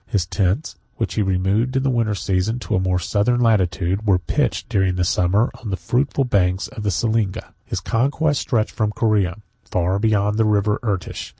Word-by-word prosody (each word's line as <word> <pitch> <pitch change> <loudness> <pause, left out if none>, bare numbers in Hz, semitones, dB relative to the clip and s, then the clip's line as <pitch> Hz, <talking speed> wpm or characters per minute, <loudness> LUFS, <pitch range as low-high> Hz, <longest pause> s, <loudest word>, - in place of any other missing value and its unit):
His 95 -5 0
tents, 95 - -1 0.2
which - - -2
he - - 0
removed 100 +6 0
in 135 - 0
the 135 - +1
winter 115 -4 0
season 95 +4 -1
to - - -4
a - - +2
more 95 -1 +1
southern 105 +6 +1
latitude, 95 -4 +1
were 95 -2 +5
pitched, 90 - -1
during 95 -2 +1
the 90 - 0
summer, 90 +6 +2
on 110 - -6
the 95 - -2
fruitful 125 - 0
banks 95 -6 +1
of 125 -5 -8
the 105 - 0
Selinga. 110 0 -1
His - - -4
conquests 140 +5 +1
stretched 110 -2 0
from 110 -2 0
Corea 105 -6 +1 0.3
far 90 +2 0
beyond 105 -1 +1
the 110 - +4
River 105 0 +1
Irtish. 100 -7 -3
105 Hz, 190 wpm, -21 LUFS, 95-115 Hz, 0.3 s, were